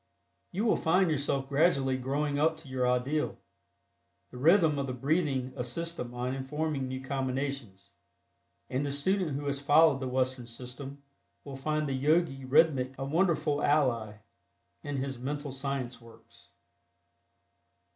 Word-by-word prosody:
You 205 +4 -1
will 220 - +3
find 180 +1 +3
yourself 140 -2 0
gradually 140 -2 +2
growing 140 +3 -1
up 160 +1 +2
to 160 -2 -13
your 130 -1 0
ideal. 130 +5 0 0.9
The 125 - -9
rhythm 160 0 +4
of 135 - -2
the 130 - -3
breathing 135 -1 0
assists 140 +7 -2
the 145 - -4
mind 125 +1 -4
in 135 - -4
forming 150 -1 -2
new 130 0 -5
combinations, 135 -6 -3 0.8
and 130 +2 -1
the 145 - -2
student 155 +1 0
who 145 - -5
has 140 -1 -1
followed 145 0 +5
the 130 - -3
Western 130 -1 -1
system 130 +4 -8 0.4
will 140 -1 -8
find 155 +2 -1
the 135 - -1
Yogi 140 0 +1
Rhythmic 135 -2 +3
a 135 - -3
wonderful 155 -1 +1
ally 125 -8 +2 0.7
in 145 -1 -4
his 135 -1 -3
"Mental 145 +2 -4
Science" 135 -2 -4
works. 115 -1 -18
140 Hz, 145 wpm, -30 LUFS, 130-150 Hz, 0.9 s, followed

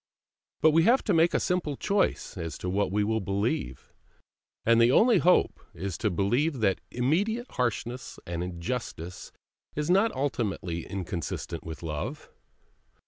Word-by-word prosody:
But 160 - +6
we 165 +2 +5
have 250 +3 +4
to 205 - +1
make 165 +1 +4
a - - +3
simple 170 -6 -1
choice 200 0 0
as 80 -5 -5
to 90 - -3
what 100 0 0
we 105 +1 +2
will 110 +2 +1
believe, 100 - -2 0.7
and 115 0 +5
the 120 +1 +6
only 225 - +5
hope 180 +1 +3 0.2
is 95 +1 -4
to 110 - +1
believe 120 - +1
that 95 -3 +2
immediate 200 - 0
harshness 125 0 -2
and 85 0 -3
injustice 90 -1 -5 0.4
is 150 +3 0
not 200 +5 +4
ultimately 100 - -2
inconsistent 90 -3 -4
with 80 +1 -8
Love. 75 -3 -5
115 Hz, 145 wpm, -28 LUFS, -, 0.7 s, But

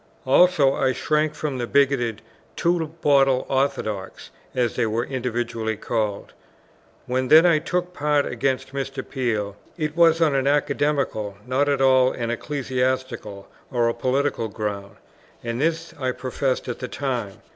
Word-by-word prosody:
Also 140 0 +5
I 130 -1 +1
shrank 150 +4 0
from 145 -4 -3
the 120 - -2
bigoted 125 -6 +1 0.3
"two 170 -2 +1 0.2
bottle 135 -3 +4
orthodox," 130 -8 -2 0.2
as 120 -3 0
they 115 - +1
were 115 +2 0
invidiously 120 -4 -3
called. 105 -3 -3 0.7
When 130 +1 -1
then 160 +5 +7
I 170 -3 +5
took 180 +2 -2
part 150 -2 +1
against 130 +2 -2
Mr. 135 -1 -4
Peel, 110 -7 -2 0.2
it 155 -2 -2
was 165 -1 +5
on 160 -3 +3
an 135 0 +1
academical, 140 -7 0
not 135 +3 +1
at 140 -1 +1
all 130 -1 +4
an 115 -1 -3
ecclesiastical 130 -5 -3 0.2
or 120 -2 +2
a 115 - +1
political 130 0 0
ground; 100 -2 -5 0.5
and 115 +2 -3
this 165 +1 -1
I 130 -2 -1
professed 130 +1 -2
at 120 - -4
the 125 - -4
time. 125 -8 -3
130 Hz, 145 wpm, -23 LUFS, 120-145 Hz, 0.7 s, then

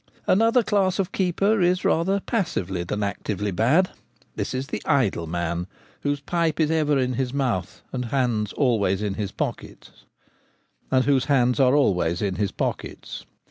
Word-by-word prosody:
Another 230 +5 +4
class 195 -3 +1
of 195 -1 -1
keeper 195 +3 +1
is 180 +1 +2
rather 190 +5 +2
passively 100 - -2
than 105 +4 -3
actively 100 +1 -2
bad. 140 - +3 0.4
This - - -3
is 130 +1 -2
the 150 - -5
idle 120 - +1
man, 85 +1 -2 0.3
whose 145 0 -1
pipe 165 +1 -1
is 155 -1 +2
ever 150 -3 +2
in 130 -1 0
his 130 +1 -2
mouth 115 -10 -2
and 125 -1 -2
whose 115 - -8
hands 120 -6 0
are - - -12
always 105 -6 +1
in 105 -2 -1
his 100 -1 -4
pockets. - - -6
135 Hz, 135 wpm, -24 LUFS, -, 0.4 s, Another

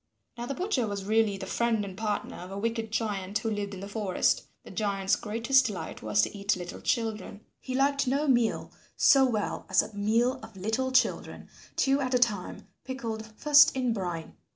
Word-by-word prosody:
Now 240 0 -5
the 275 - -3
butcher 355 - 0
was 200 -1 -4
really 215 -1 +2
the 190 - -6
friend 225 0 0
and 190 -2 -8
partner 210 0 -3
of 180 - -9
a 195 - -6
wicked 225 +1 -2
giant 205 -3 -1
who 225 -1 -2
lived 205 -1 -3
in 185 - -9
the 200 - -6
forest. 200 -3 0 0.2
The - - -12
giant's 200 -3 0
greatest 235 +5 +2
delight 205 -5 -6
was 110 0 +2
to - - -2
eat 200 +1 0
little 175 -1 -7
children. 220 -3 -2 0.2
He 255 - -5
liked 280 0 +2
no 280 +4 +1
meal 240 -4 +1 0.3
so 270 -1 +6
well 215 -4 -2
as 190 - +4
a 220 - -10
meal 230 +6 +1
of 220 -3 -12
little 225 +7 -1
children, 260 - 0 0.3
two 270 +1 +2
at 255 -1 0
a - - +6
time, 215 -7 -1 0.2
pickled 230 -4 -5
first 295 -2 +6
in 250 -3 +1
brine. 175 -6 -4
220 Hz, 195 wpm, -28 LUFS, 200-250 Hz, 0.3 s, so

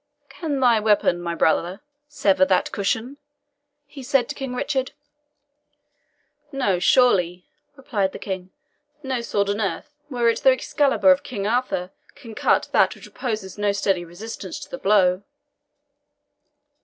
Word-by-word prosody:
"Can 300 -5 -3
thy 240 -4 +4
weapon, 210 -5 +2
my 170 -1 -3
brother, 175 +4 +1 0.3
sever 195 -10 +2
that 185 -1 +1
cushion?" 225 +7 -2 0.7
he 280 -1 -11
said 260 -1 +1
to - - -3
King 270 -3 -5
Richard. 265 0 -2 1.6
"No, 250 - 0
surely," 180 -5 +3 0.3
replied 210 -8 -2
the - - -8
King; 185 -2 -6 0.5
"no 260 -3 -2
sword 205 -3 -1
on 205 +2 -2
earth, 215 +8 -3 0.2
were 240 -4 0
it 230 - +2
the 265 - +5
Excalibur 280 +2 +3
of 275 - +3
King 205 -6 -5
Arthur, 215 -5 -1 0.2
can 230 -2 -11
cut - - +1
that - - +3
which - - -13
opposes 215 -6 -5
no 205 0 +2
steady 195 -3 0
resistance 185 +2 -8
to - - -11
the 265 - -6
blow." 190 -4 +3
215 Hz, 145 wpm, -23 LUFS, 190-260 Hz, 1.6 s, the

